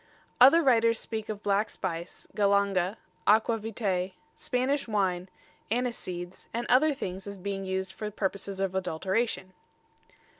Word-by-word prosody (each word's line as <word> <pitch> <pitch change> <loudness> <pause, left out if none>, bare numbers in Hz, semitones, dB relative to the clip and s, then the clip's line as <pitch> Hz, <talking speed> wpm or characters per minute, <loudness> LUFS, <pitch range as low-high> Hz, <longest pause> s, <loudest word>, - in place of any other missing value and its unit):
Other 275 +7 +8
writers 230 -4 +4
speak 220 -1 -4
of 210 -1 -5
black 205 +2 +2
spice, 170 -1 -5
galanga, 200 -1 +2 0.3
aqua 220 +2 +4
vitæ, 195 -4 -2 0.2
Spanish 275 -1 0
wine, 190 -4 0 0.4
aniseeds 190 -7 -3
and 240 +1 -1
other 290 +5 +5
things 190 -4 -5
as 200 0 -6
being 195 +1 -4
used 190 0 -2
for 210 +1 -4
purposes 200 -1 -3
of 195 -1 0
adulteration. 190 +3 -1
200 Hz, 125 wpm, -29 LUFS, 190-230 Hz, 0.4 s, Other